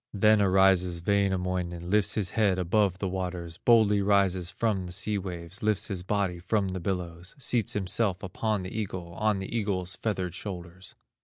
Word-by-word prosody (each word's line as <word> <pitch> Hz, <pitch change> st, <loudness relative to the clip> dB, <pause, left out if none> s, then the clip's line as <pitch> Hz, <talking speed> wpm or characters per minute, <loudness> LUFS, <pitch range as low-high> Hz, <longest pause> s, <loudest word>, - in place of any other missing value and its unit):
Then 105 Hz, +1 st, +5 dB
arises 95 Hz, -3 st, +3 dB
Wainamoinen, 90 Hz, -3 st, 0 dB
Lifts 105 Hz, -1 st, +3 dB
his 100 Hz, -4 st, -1 dB
head 100 Hz, -4 st, +2 dB
above 90 Hz, +1 st, +1 dB
the 100 Hz, -, -2 dB
waters, 90 Hz, -3 st, -4 dB
Boldly 110 Hz, -4 st, +4 dB
rises 95 Hz, -3 st, +2 dB
from 95 Hz, -1 st, -1 dB
the -, -, -7 dB
sea 100 Hz, +3 st, -1 dB
waves, 90 Hz, +2 st, -7 dB
Lifts 105 Hz, -2 st, +1 dB
his 95 Hz, -3 st, -3 dB
body 95 Hz, -2 st, -1 dB
from 95 Hz, +2 st, 0 dB
the 95 Hz, 0 st, -3 dB
billows, 90 Hz, -1 st, -4 dB
Seats 120 Hz, -5 st, +1 dB
himself 95 Hz, -1 st, 0 dB
upon 105 Hz, +2 st, -2 dB
the 95 Hz, -, -7 dB
eagle, 95 Hz, -5 st, -4 dB
On 105 Hz, +3 st, +1 dB
the 95 Hz, +4 st, -5 dB
eagle's 95 Hz, -4 st, -2 dB
feathered 95 Hz, -5 st, -2 dB
shoulders. 90 Hz, -1 st, -8 dB
95 Hz, 165 wpm, -28 LUFS, 90-105 Hz, -, Then